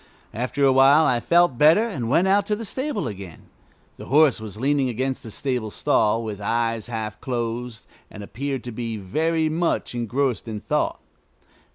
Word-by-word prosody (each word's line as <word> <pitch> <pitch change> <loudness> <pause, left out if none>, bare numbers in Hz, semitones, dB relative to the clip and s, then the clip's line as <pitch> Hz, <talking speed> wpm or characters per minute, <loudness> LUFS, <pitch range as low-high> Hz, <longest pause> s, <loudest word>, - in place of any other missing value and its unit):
After 125 +5 -1
a 135 - +5
while 140 +4 +6
I 125 -4 +2
felt 170 -2 +2
better, 165 +10 +5
and 130 - -4
went 170 +8 +3
out 200 +1 +2
to 210 - +1
the 225 +2 -6
stable 260 - -3
again. 95 -5 -9 0.5
The - - -10
horse 145 -3 +4
was 105 -2 -8
leaning 135 +2 +1
against 130 +3 -2
the 115 - -10
stable 125 -1 -3
stall, 105 +3 +1
with 105 -2 -6
eyes 115 +1 -1
half 110 -3 -5
closed, 120 -2 -4 0.2
and 105 - -10
appeared 135 +4 -4
to 120 - -6
be 115 -1 -4
very 160 - 0
much 165 -2 -1
engrossed 120 +1 -1
in 110 -2 -4
thought. - - -1
125 Hz, 175 wpm, -23 LUFS, 115-155 Hz, 0.5 s, while